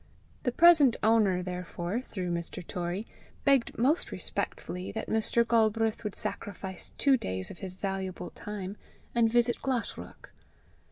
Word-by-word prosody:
The 245 - 0
present 315 -4 +7
owner, 210 -5 +4
therefore, 180 +3 -3
through 185 -8 -4
Mr. 170 +1 -4
Torrie, 180 +5 -3 0.4
begged 275 -4 +3
most 280 +8 +2
respectfully 180 +1 -4
that 220 - -4
Mr. 225 +1 +2
Galbraith 225 -1 +2
would 210 -2 -3
sacrifice 190 -2 -4
two 275 -2 +4
days 95 - -4
of - - -10
his 185 -2 -6
valuable 190 -2 -4
time, 205 -1 -6 0.4
and 230 -2 +3
visit 240 0 +3
Glashruach. 255 -4 -4
210 Hz, 130 wpm, -29 LUFS, 180-235 Hz, 0.4 s, present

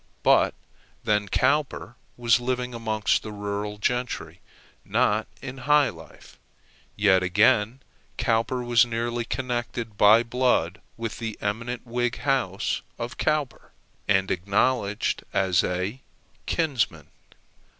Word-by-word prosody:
But - - +4 0.5
then 105 -2 +1
Cowper 135 0 0 0.2
was 120 0 +3
living 125 0 -2
amongst 110 -2 0
the 110 - -7
rural 105 0 -4
gentry, 125 +3 -2 0.4
not - - +1 0.2
in 130 +1 -7
high 150 -1 +5
life; 80 -1 -14 0.6
yet, 100 -3 +4
again, 105 +6 +3 0.4
Cowper 120 +2 0
was 120 -2 +5
nearly 120 0 -2
connected 120 -4 -4
by 110 +3 +7
blood 120 -7 0 0.2
with 115 -1 -5
the 115 -2 -4
eminent 115 +4 -3
Whig 120 0 -1
house 130 -9 -1 0.2
of 120 +1 -5
Cowper, 150 -4 -1 0.3
and 95 -1 +2
acknowledged 100 +3 0
as 95 -2 +2
a 95 +8 -2 0.5
kinsman. 120 - 0
115 Hz, 110 wpm, -25 LUFS, 105-125 Hz, 0.6 s, by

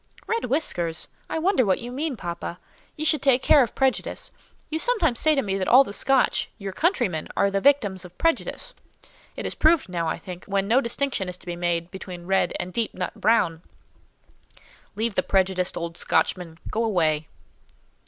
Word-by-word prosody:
"Red 460 0 -1
whiskers! 180 - 0 0.2
I - - -2
wonder 340 -4 +2
what 190 -4 +2
you 240 +1 -7
mean, 280 0 -3
papa. 170 -1 -5 0.4
You 310 - -4
should 310 -3 +3
take 265 -2 +3
care 290 - +6
of 235 - -1
prejudice. 265 -1 -1 0.4
You 315 - -1
sometimes 335 - +2
say 310 -1 +4
to 275 - +1
me 195 -2 -2
that 185 - -1
all 260 +3 +8
the 200 - -8
Scotch, 270 +3 +2
your 200 -3 -5
countrymen, 240 - 0
are 200 0 +3
the 195 0 0
victims 205 -10 +3
of 180 0 -13
prejudice. 330 +8 0 0.6
It - - -5
is - - 0
proved 315 - +3
now, 170 -2 -2
I - - -1
think, 180 -1 -9
when 195 0 -1
no 245 +5 +4
distinction 235 -5 -1
is 180 - -6
to - - -16
be 175 -1 -4
made 175 0 -1
between 180 -2 -8
red 190 -1 +2
and 180 +1 -5
deep 230 -2 -2
nut 180 0 -3
brown." 170 -8 +2 1.3
"Leave 225 +1 -1
the 185 - +2
prejudiced 185 -1 +1
old 170 0 -5
Scotchman; 170 -3 0
go 225 - 0
away." 160 -8 +1
200 Hz, 185 wpm, -24 LUFS, 180-270 Hz, 1.3 s, all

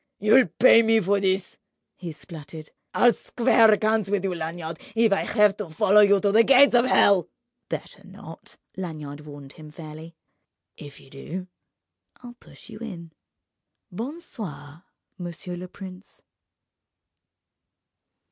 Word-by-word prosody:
"You'll 220 +4 +4
pay 230 +6 +5
me 225 0 +3
for 200 0 +1
this!" 190 -1 -2 0.4
he 175 -2 -8
spluttered. 155 +1 -11 0.2
"I'll 240 -1 +4
square 230 -2 +3
accounts 215 -1 +1
with 200 -2 -1
you, 190 -2 -2
Lanyard, 165 -1 -6 0.2
if 225 -2 +3
I 195 - -1
have 210 -3 +3
to 210 -5 -6
follow 195 +6 +4
you 200 -1 +4
to 200 0 +1
the 220 +3 +5
gates 270 +2 +5
of 240 0 +4
hell!" 200 -8 +3 0.4
"Better - - -7
not," - - -14 0.2
Lanyard 150 -5 -7
warned 145 -2 -12
him 155 -1 -13
fairly, 155 +1 -11 0.6
"if 145 -1 -12
you 135 - -19
do, 180 +7 -8 0.8
I'll 240 -1 -10
push 240 - -18
you 215 -2 -11
in... 175 -8 -9 0.8
Bon 250 - -6
soir, 170 - -10 0.3
monsieur 175 0 -7
le 180 +1 -8
prince!" 185 +1 -13
190 Hz, 140 wpm, -24 LUFS, 160-220 Hz, 0.8 s, pay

